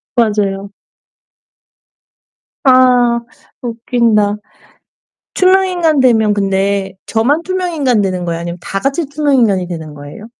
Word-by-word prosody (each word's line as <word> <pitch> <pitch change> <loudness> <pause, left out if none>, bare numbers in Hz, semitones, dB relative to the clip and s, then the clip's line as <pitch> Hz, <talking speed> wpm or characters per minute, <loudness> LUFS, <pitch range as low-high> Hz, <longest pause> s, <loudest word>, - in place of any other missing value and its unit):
맞아요. 205 -4 0 1.9
아 250 -2 +4 0.4
웃긴다. 230 -3 0 1.0
투명인간 365 -5 +2
되면 220 -4 +3
근데 195 -1 -1
저만 275 +9 0
투명인간이 330 - 0
되는 185 -2 -2
거예요? 165 -1 -3
아니면 170 +1 -5
다 195 - -4
같이 280 - -1
투명인간이 255 - +1
되는 160 -4 -7
거예요? 145 +9 -11
225 Hz, 250 characters per minute, -14 LUFS, 195-275 Hz, 1.9 s, 아